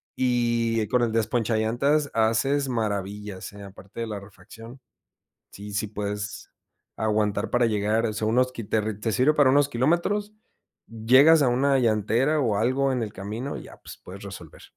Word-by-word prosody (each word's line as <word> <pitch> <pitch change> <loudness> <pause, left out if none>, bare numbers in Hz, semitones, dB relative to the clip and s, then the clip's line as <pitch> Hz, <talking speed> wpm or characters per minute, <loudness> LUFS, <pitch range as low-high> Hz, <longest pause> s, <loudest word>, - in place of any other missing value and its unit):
y 120 -3 0
con 125 - +2
el 115 -2 +1
desponchallantas 115 +6 0
haces 130 +5 +1
maravillas, 105 -4 -4
¿eh? 100 0 -11
Aparte 100 +3 -10
de - - -1
la 105 -2 -5
refracción, 110 +6 -13 0.7
sí, 105 +1 -9
sí 105 +1 -1
puedes 105 0 -5 0.4
aguantar 105 -1 0
para 120 -1 +2
llegar, 110 +1 0
sea, 110 0 -2
unos 125 +3 +1
te 110 -1 -2
sirve 130 +9 +3
para 145 -3 +4
unos 140 +1 +4
kilómetros, 170 - 0 0.6
llegas 130 +8 +5
a 130 - +3
una 135 +2 +2
llantera, 120 +6 +1
o 110 -7 +1
algo 130 +4 +1
en 125 - -1
el 105 - -5
camino, 110 +8 -5
y - - -9
ya, - - -13
pues, - - -12
puedes 95 +2 -10
resolver. 95 -5 -10
115 Hz, 155 wpm, -25 LUFS, 105-130 Hz, 0.7 s, llegas